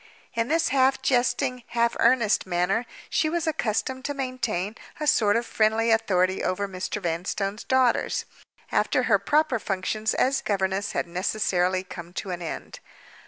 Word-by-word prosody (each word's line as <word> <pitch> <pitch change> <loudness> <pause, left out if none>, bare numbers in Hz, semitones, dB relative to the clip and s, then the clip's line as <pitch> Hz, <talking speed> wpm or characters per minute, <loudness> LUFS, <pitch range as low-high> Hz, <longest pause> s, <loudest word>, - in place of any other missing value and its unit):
In 230 -1 0
this 330 +1 +2
half 265 0 +2
jesting, 250 0 +1 0.2
half 235 0 +3
earnest 230 -5 +3
manner 185 +7 0 0.2
she 315 - +1
was 340 +1 -1
accustomed 260 -3 -1
to 285 - -2
maintain 230 -7 -2 0.2
a 305 - -2
sort 210 -8 +4
of 235 +1 +1
friendly 225 +1 +2
authority 190 -4 +2
over 185 +2 -1
Mr. 190 +2 -4
Vanstone's 195 +4 -2
daughters, 260 -2 +2 0.5
after 255 - +2
her 215 -5 +3
proper 290 +3 +2
functions 210 +3 -1
as 265 +1 +2
governess 195 0 -1
had - - 0
necessarily 185 0 0
come 175 -2 -9
to 190 - -4
an 175 -1 -4
end. 165 - -6
220 Hz, 150 wpm, -25 LUFS, 190-255 Hz, 0.5 s, sort